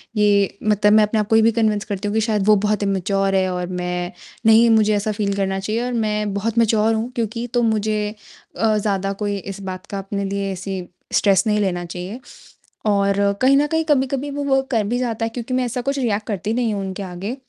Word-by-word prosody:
ये 205 Hz, -2 st, +2 dB
मतलब 210 Hz, -1 st, +3 dB
मैं 215 Hz, 0 st, +6 dB
अपने 210 Hz, +1 st, 0 dB
आप 210 Hz, -, -1 dB
को 220 Hz, -, +4 dB
ये 225 Hz, -, +6 dB
भी 225 Hz, +1 st, +4 dB
कन्विन्स 215 Hz, -2 st, 0 dB
करती 205 Hz, -1 st, -4 dB
हूँ 205 Hz, -, -2 dB
कि 220 Hz, -, +2 dB
शायद 215 Hz, -3 st, 0 dB
वो 215 Hz, -, +7 dB
बहुत 210 Hz, 0 st, +1 dB
इम्मूचियोर 195 Hz, 0 st, 0 dB
है 190 Hz, -1 st, +2 dB
और 180 Hz, 0 st, -3 dB
मैं 180 Hz, -1 st, -3 dB, 0.3 s
नहीं 225 Hz, +1 st, +6 dB
मुझे 215 Hz, -1 st, +4 dB
ऐसा 210 Hz, +1 st, -1 dB
फ़ील 205 Hz, -1 st, -1 dB
करना 195 Hz, -1 st, -1 dB
चाहिए 215 Hz, +4 st, -2 dB
और 250 Hz, -, -3 dB
मैं 210 Hz, -3 st, -1 dB
बहुत 220 Hz, +3 st, -2 dB
मैच्योर 225 Hz, -1 st, +3 dB
हूँ 225 Hz, +3 st, -2 dB
क्योंकि 230 Hz, 0 st, -2 dB
तो 245 Hz, -, +2 dB
मुझे 215 Hz, -1 st, 0 dB, 0.4 s
अ, 220 Hz, -1 st, +2 dB
ज़्यादा 195 Hz, -2 st, -1 dB
कोई 205 Hz, -1 st, -1 dB
इस 195 Hz, 0 st, -7 dB
बात 185 Hz, -1 st, -6 dB
का 200 Hz, -, -6 dB
अपने 200 Hz, +1 st, -4 dB
लिए 195 Hz, 0 st, -2 dB
ऐसी 190 Hz, 0 st, -5 dB, 0.3 s
स्ट्रेस 195 Hz, -2 st, +4 dB
नहीं 210 Hz, 0 st, +2 dB
लेना 180 Hz, -3 st, -1 dB
चाहिए 180 Hz, +6 st, -6 dB, 0.7 s
और 200 Hz, -1 st, +2 dB, 0.2 s
कहीं 265 Hz, +2 st, +5 dB
न 290 Hz, -, +3 dB
कहीं 320 Hz, +2 st, 0 dB
कभी-कभी 275 Hz, -1 st, 0 dB
वो 285 Hz, +1 st, -3 dB
वर्क 270 Hz, -1 st, +1 dB
कर 225 Hz, -4 st, +2 dB
भी 240 Hz, +3 st, 0 dB
जाता 230 Hz, -2 st, -1 dB
है -, -, -2 dB
क्योंकि 240 Hz, +2 st, -5 dB
मैं 255 Hz, 0 st, +1 dB
ऐसा 245 Hz, +1 st, -3 dB
कुछ 275 Hz, +3 st, -2 dB
रिएक्ट 215 Hz, -4 st, -1 dB
करती 210 Hz, +1 st, -2 dB
नहीं 235 Hz, -2 st, 0 dB
हूँ 200 Hz, -, -2 dB
उनके 190 Hz, +1 st, -5 dB
आगे। 190 Hz, +5 st, -5 dB
210 Hz, 230 wpm, -21 LUFS, 195-230 Hz, 0.7 s, वो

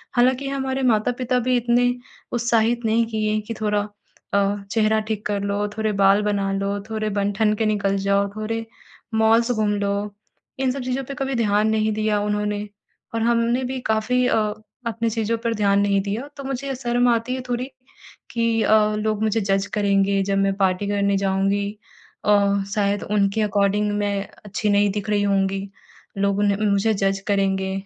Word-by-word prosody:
हालाँकि 255 Hz, +3 st, +2 dB
हमारे 265 Hz, -1 st, -2 dB
माता-पिता 245 Hz, +2 st, +1 dB
भी 255 Hz, -, +3 dB
इतने 245 Hz, +1 st, +2 dB, 0.4 s
उत्साहित 235 Hz, 0 st, +1 dB
नहीं 225 Hz, +1 st, +2 dB
किए 215 Hz, -1 st, -1 dB
हैं 215 Hz, -, 0 dB
कि 230 Hz, -, -3 dB
थोड़ा 210 Hz, -1 st, +1 dB, 0.5 s
अ, 200 Hz, 0 st, +2 dB, 0.2 s
चेहरा 220 Hz, -1 st, +2 dB
ठीक 215 Hz, -1 st, -4 dB
कर 205 Hz, -1 st, -1 dB
लो, 200 Hz, +1 st, -1 dB
थोड़े 220 Hz, -1 st, 0 dB
बाल 195 Hz, +1 st, +5 dB
बना 200 Hz, -1 st, 0 dB
लो, 200 Hz, +1 st, -1 dB
थोड़े 215 Hz, -1 st, -2 dB
बन-ठन 205 Hz, +1 st, +1 dB
के 220 Hz, -, -1 dB
निकल 200 Hz, -2 st, +1 dB
जाओ, 200 Hz, +1 st, +1 dB
थोड़े 225 Hz, +1 st, -3 dB, 0.5 s
मॉल्स 225 Hz, +2 st, +4 dB
घूम 215 Hz, -3 st, +1 dB
लो। 200 Hz, 0 st, -2 dB, 0.4 s
इन 260 Hz, -1 st, +1 dB
सब 275 Hz, 0 st, -4 dB
चीज़ों 255 Hz, +2 st, -2 dB
पर 275 Hz, -, -6 dB
कभी 270 Hz, 0 st, -2 dB
ध्यान 210 Hz, -2 st, +2 dB
नहीं 220 Hz, 0 st, +1 dB
दिया 215 Hz, -1 st, 0 dB
उन्होंने 210 Hz, 0 st, -1 dB, 0.5 s
और 225 Hz, -, 0 dB
हमने 235 Hz, +2 st, +2 dB
भी 260 Hz, +1 st, -3 dB
काफ़ी 235 Hz, +4 st, +1 dB
अ, -, -, +2 dB, 0.5 s
अपनी 230 Hz, 0 st, -1 dB
चीज़ों 225 Hz, 0 st, -1 dB
पर 230 Hz, -1 st, +1 dB
ध्यान 200 Hz, -1 st, +2 dB
नहीं 200 Hz, -1 st, +2 dB
दिया 210 Hz, +8 st, -4 dB
तो 275 Hz, -, -7 dB
मुझे 270 Hz, 0 st, -3 dB
शर्म 245 Hz, -1 st, +1 dB
आती 235 Hz, +2 st, 0 dB
है 260 Hz, -, -4 dB
थोड़ी 245 Hz, +2 st, -2 dB, 0.6 s
कि 230 Hz, -1 st, +1 dB
अ, -, -, +3 dB, 0.2 s
लोग 215 Hz, 0 st, -1 dB
मुझे 220 Hz, +1 st, +1 dB
जज़ 195 Hz, 0 st, 0 dB
करेंगे 200 Hz, -1 st, +2 dB
जब 195 Hz, 0 st, 0 dB
मैं 195 Hz, 0 st, +2 dB
पार्टी 190 Hz, 0 st, +1 dB
करने 200 Hz, -1 st, +1 dB
जाऊँगी 195 Hz, +1 st, 0 dB, 0.6 s
अ, 200 Hz, -1 st, +3 dB
शायद 205 Hz, -1 st, 0 dB
उनके 200 Hz, +1 st, +2 dB
अकॉर्डिंग 205 Hz, 0 st, +1 dB
मैं 200 Hz, -1 st, -1 dB, 0.2 s
अच्छी 210 Hz, +1 st, -2 dB
नहीं 205 Hz, 0 st, +3 dB
दिख 210 Hz, +1 st, -4 dB
रही 205 Hz, -1 st, +2 dB
होंगी 195 Hz, 0 st, 0 dB, 0.5 s
लोग 200 Hz, 0 st, +1 dB
उन्हें 200 Hz, -1 st, +2 dB
मुझे 200 Hz, +3 st, +2 dB
जज 195 Hz, 0 st, 0 dB
करेंगे 195 Hz, -1 st, +1 dB
210 Hz, 175 wpm, -22 LUFS, 200-230 Hz, 0.6 s, बाल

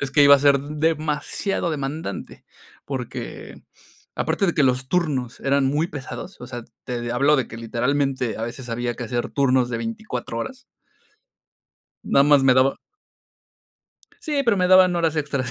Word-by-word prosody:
es 140 Hz, -, -2 dB
que 145 Hz, +2 st, +4 dB
iba 140 Hz, 0 st, +9 dB
a -, -, +4 dB
ser 140 Hz, 0 st, +4 dB
demasiado 155 Hz, +5 st, -1 dB
demandante, 150 Hz, +2 st, -5 dB, 0.4 s
porque, -, -, -6 dB, 0.5 s
aparte 195 Hz, -, 0 dB
de 175 Hz, -, 0 dB
que 150 Hz, -, +3 dB
los 130 Hz, 0 st, +1 dB
turnos 140 Hz, -8 st, -1 dB
eran 140 Hz, 0 st, +2 dB
muy 145 Hz, +5 st, +1 dB
pesados, 145 Hz, +5 st, -8 dB
o 125 Hz, -, -8 dB
sea, 120 Hz, -2 st, -7 dB, 0.2 s
te 120 Hz, -1 st, -3 dB
hablo 140 Hz, +5 st, +3 dB
de 130 Hz, -, 0 dB
que 115 Hz, -, -9 dB
literalmente 125 Hz, +1 st, -1 dB
a -, -, -4 dB
veces 120 Hz, +2 st, -6 dB
había 120 Hz, +1 st, -2 dB
que 120 Hz, -, -6 dB
hacer 120 Hz, 0 st, -3 dB
turnos 130 Hz, -3 st, +2 dB
de 120 Hz, -, -2 dB
24 215 Hz, -, -5 dB
horas. 255 Hz, -, -6 dB, 1.4 s
Nada 140 Hz, -, +4 dB
más 145 Hz, -1 st, +5 dB
me 135 Hz, -1 st, +5 dB
daba 130 Hz, +1 st, +3 dB, 1.5 s
Sí, 295 Hz, -3 st, 0 dB
pero 230 Hz, -4 st, +3 dB
me 180 Hz, -1 st, +2 dB
daban 185 Hz, -1 st, +6 dB
horas 165 Hz, -2 st, 0 dB
extras. 140 Hz, -4 st, -2 dB
140 Hz, 165 wpm, -23 LUFS, 125-160 Hz, 1.5 s, iba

